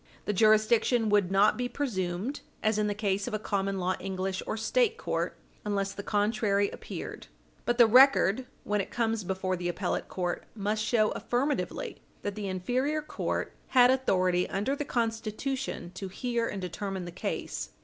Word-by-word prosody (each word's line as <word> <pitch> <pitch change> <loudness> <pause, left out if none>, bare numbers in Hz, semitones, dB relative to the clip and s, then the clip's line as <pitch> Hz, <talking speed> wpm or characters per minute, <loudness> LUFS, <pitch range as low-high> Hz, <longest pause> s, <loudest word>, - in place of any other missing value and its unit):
The 210 - 0
jurisdiction 215 +2 +4
would 205 -3 +3
not 200 +2 +4
be 245 0 -1
presumed, 205 -2 -2 0.2
as 215 -1 +2
in 210 - +2
the 205 - -1
case 200 -2 -1
of - - -2
a - - +1
common 195 -2 -1
law 185 0 0
English 190 0 -3
or - - -2
State 455 - +2
court, - - -2 0.3
unless 200 -1 -1
the - - -6
contrary 205 -1 +1
appeared. - - -7 0.4
But 240 0 +2
the 240 - +8
record, 255 -1 +6 0.2
when 210 0 0
it - - -6
comes 225 -2 0
before 185 0 -1
the 175 0 -2
appellate 175 +1 -2
court, 180 -2 -3
must 215 +1 -1
show 215 -2 +2
affirmatively 245 - -2 0.2
that 205 - -2
the 205 -1 -4
inferior 255 +11 -1
court - - -3
had 250 -1 +6
authority 185 -9 +2
under 210 +8 0
the 295 - -3
Constitution 230 -3 -2
to 195 - -5
hear 235 +4 -1
and 200 - -4
determine 190 +1 -4
the 175 - -6
case. 175 - -4
210 Hz, 170 wpm, -29 LUFS, 190-240 Hz, 0.4 s, the